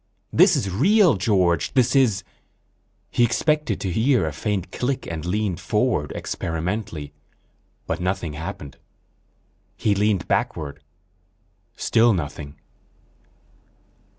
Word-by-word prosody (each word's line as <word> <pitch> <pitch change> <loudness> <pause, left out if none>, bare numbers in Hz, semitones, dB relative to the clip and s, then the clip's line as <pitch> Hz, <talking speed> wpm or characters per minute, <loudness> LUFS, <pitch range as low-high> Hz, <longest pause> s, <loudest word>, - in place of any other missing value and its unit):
This - - +6
is 100 - -1
real 190 - +4
George, 95 - +1
this 130 0 +3
is... 125 -8 +3 0.9
He 120 - +2
expected 150 0 +1
to 95 - -2
hear 115 - +2
a 80 - -3
faint 100 +4 -3
click 130 +1 -2
and 80 -2 -5
leaned 95 0 -1
forward - - 0
experimentally, 85 -2 -4 0.7
but - - -3
nothing 90 -3 -2
happened. 75 -2 -7 1.0
He 105 - +2
leaned 100 -2 +1
backward. 70 -3 -2 0.9
Still 115 0 +3
nothing. 75 -4 -5
100 Hz, 105 wpm, -23 LUFS, 80-115 Hz, 1.0 s, This